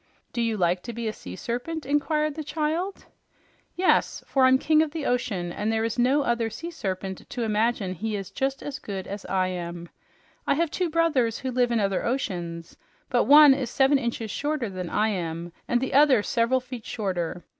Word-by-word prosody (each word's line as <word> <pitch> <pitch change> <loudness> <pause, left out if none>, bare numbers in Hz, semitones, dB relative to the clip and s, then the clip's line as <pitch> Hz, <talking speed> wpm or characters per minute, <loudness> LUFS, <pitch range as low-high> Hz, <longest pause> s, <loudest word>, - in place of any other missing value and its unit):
"Do 235 - -1
you 225 -2 0
like 180 -1 +1
to 235 - -7
be 230 0 -4
a 215 - -2
sea 90 - -9
serpent?" 245 - -4
inquired 300 +2 +1
the 310 +1 -5
child. 315 +6 -2 0.7
"Yes, 365 +1 +2
for 265 -2 +3
I'm 260 0 +6
King 310 +3 +3
of 315 0 -2
my 315 - -2
Ocean, 205 -9 -1
and 210 +5 -2
there 225 0 0
is 230 +1 -2
no 265 +4 +3
other 235 -2 0
sea 335 +9 -7
serpent 190 - -5
to 245 - -3
imagine 215 -3 0
he 215 +5 -3
is 195 -2 -5
just 270 0 -2
as 290 0 -5
good 195 -2 -5
as 200 0 -7
I 185 -1 +1
am. 170 -1 -6 0.6
I - - +3
have 330 0 0
two 360 +1 -1
brothers 305 -9 +2
who 260 - -4
live 245 -1 +2
in 235 - +2
other 195 -2 0
oceans, 175 -9 -3 0.4
but 245 - +3
one 295 0 +9
is 265 -3 -2
seven 270 +2 +3
inches 235 -3 -3
shorter 290 -6 -2
than 180 -2 -5
I 215 +1 +1
am, 170 -3 -4
and 240 - +2
the 265 - -3
other 270 -6 +5
several 245 +3 +1
feet 250 -3 -9
shorter. 180 -5 -3
235 Hz, 200 wpm, -26 LUFS, 195-285 Hz, 0.7 s, one